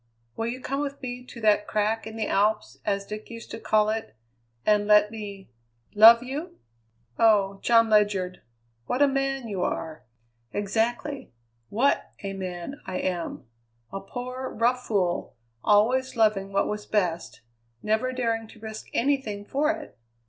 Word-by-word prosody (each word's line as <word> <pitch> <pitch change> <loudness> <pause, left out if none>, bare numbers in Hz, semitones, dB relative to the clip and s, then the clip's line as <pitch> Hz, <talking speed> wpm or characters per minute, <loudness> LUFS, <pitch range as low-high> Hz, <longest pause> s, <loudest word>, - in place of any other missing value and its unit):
Will 225 - -2
you 245 +2 -3
come 275 +2 -2
with 280 -1 -3
me 250 0 -5
to 245 - -11
that 210 -1 +3
crack 215 +1 0
in 220 - -8
the 220 -1 -1
Alps, 195 - +1
as 200 -1 -1
Dick 210 +1 -7
used 230 -1 -9
to - - -6
call 215 -1 +2
it, 220 - -4 0.5
and 210 -1 +3
let 210 0 +6
me 200 - -8 0.4
love 230 +3 +9
you?" 280 +7 -6 0.6
"Oh! 200 -3 +4
John 230 -1 +5
Ledyard! 205 -4 +2 0.5
What 265 +3 +2
a - - +6
man 270 -2 -1
you 195 -4 -3
are!" 160 -3 -3 0.5
"Exactly! 230 +7 -1 0.4
What 255 +7 +1
a 195 0 -3
man 185 +8 -6
I 185 -1 -3
am! 175 -8 -3 0.5
A 195 - -3
poor, 255 +4 -5
rough 250 +3 0
fool, 185 -5 0 0.3
always 250 +6 +3
loving 210 -4 +2
what 200 0 +1
was 210 0 -4
best; 175 - -1 0.4
never 220 +4 +1
daring 230 -3 -1
to 220 - -16
risk 220 0 -8
anything 230 -6 0
for 290 +7 0
it. 315 - -4
220 Hz, 155 wpm, -26 LUFS, 200-250 Hz, 0.6 s, love